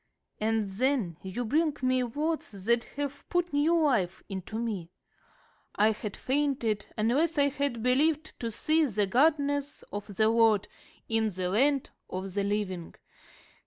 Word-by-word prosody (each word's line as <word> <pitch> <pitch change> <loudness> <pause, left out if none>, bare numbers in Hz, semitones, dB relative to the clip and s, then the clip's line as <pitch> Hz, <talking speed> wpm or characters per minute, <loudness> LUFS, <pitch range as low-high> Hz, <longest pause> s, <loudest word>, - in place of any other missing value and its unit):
And 220 -1 +1
then 210 - 0
you 190 +6 -4
bring 305 +5 +1
me 255 0 +3
words 250 - -3
that 235 +1 +2
have 285 0 -4
put 350 -2 0
new 315 +4 +3
life 195 -11 +1
into 195 +2 -5
me. 210 -8 -3 0.9
'I 215 +2 +4
had 210 -1 -5
fainted, 260 -7 0
unless 285 +10 +2
I 285 0 +4
had 280 -5 -2
believed 300 +5 +1
to 230 - -2
see 310 +8 +2
the 210 -6 +1
goodness 285 +4 +1
of 205 0 -6
the 215 +2 +3
Lord 225 -3 +4 0.4
in 225 -1 +2
the 185 -2 -3
land 270 +7 +2 0.2
of 185 0 -5
the 200 0 0
living.' 200 -4 -2
235 Hz, 145 wpm, -29 LUFS, 205-285 Hz, 0.9 s, I